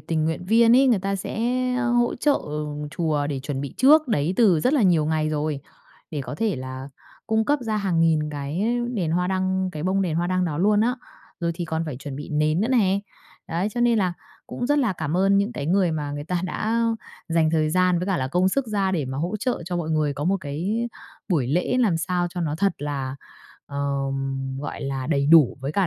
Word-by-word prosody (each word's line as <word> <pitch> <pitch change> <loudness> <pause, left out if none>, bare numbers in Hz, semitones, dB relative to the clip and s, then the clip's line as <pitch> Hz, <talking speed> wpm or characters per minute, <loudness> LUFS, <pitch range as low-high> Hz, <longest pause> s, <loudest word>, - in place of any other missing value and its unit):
tình 160 -2 -1
nguyện 160 +2 -2
viên 230 +4 +5
ấy, 270 +1 +5
người 235 -6 +4
ta 195 +1 -2
sẽ 195 - -5 0.4
hỗ 240 -1 +1
trợ 290 +3 +1 0.5
chùa 155 -3 -1
để 140 -2 -3
chuẩn 135 0 -4
bị 140 - -6
trước 295 +2 +5
đấy 155 -3 +1
từ 190 -10 +4
rất 255 - +2
là 275 -7 +3
nhiều 170 -5 +4
ngày 155 0 0
rồi, 150 -2 -2 0.5
để 150 -3 -3
có 145 - -6
thể 215 -1 -1
là 130 +1 -6 0.4
cung 220 0 +1
cấp 290 0 +2
ra 220 -2 -1
hàng 190 -5 0
nghìn 155 -2 +2
cái 145 +6 -3 0.3
đèn 175 -7 -1
hoa 180 +2 +1
đăng, 185 0 0
cái 150 -1 -5
bông 190 +2 +1
đèn 165 -4 -1
hoa 170 +1 0
đăng 185 0 +1
đó 150 -3 -2
luôn 205 +3 +3
á. 245 +3 +2 0.5
Rồi 170 -1 0
thì 175 - -4
còn 160 0 -2
phải 140 -5 -4
chuẩn 135 0 -7
bị 145 - -7
nến 155 +3 +1
nữa 225 - +1
nè, 200 -6 +3 0.5
đấy, 175 +4 -1
cho 240 - -1
nên 235 -2 +3
là 185 -3 +1 0.3
cũng 245 - -4
rất 290 +2 +2
là 245 -8 +2
cảm 155 -1 -3
ơn 195 +1 +4
những 200 +4 0
cái 140 - -4
người 180 -1 +2
mà 145 -2 -3
người 145 0 -5
ta 180 +1 -1
đã 225 +5 -1 0.5
dành 165 -1 +2
thời 155 -1 +1
gian 180 0 +3
với 180 - -3
cả 195 - +1
là 130 -4 -2
công 180 +6 +2
sức 275 +5 0
ra 200 -3 0
để 155 -6 0
mà 130 +1 -4
hỗ 175 +7 -2
trợ 240 -4 -2
cho 175 +1 -3
mọi 165 -2 -2
người 155 -2 +1
có 145 +2 -4
một 195 +2 +2
cái 185 +11 -2 0.4
buổi 155 - +1
lễ 175 - 0
làm 195 -9 +3
sao 175 +3 -1
cho 180 - -5
nó 155 -3 -1
thật 200 -2 +2
là, 140 -2 -4 0.5
ờm, 135 -1 -3
gọi 145 - -6
là, 135 -1 -3
đầy 140 -3 +1
đủ 155 -4 +6
với 140 +3 -3
cả 195 0 +2
170 Hz, 235 wpm, -24 LUFS, 150-200 Hz, 0.5 s, đủ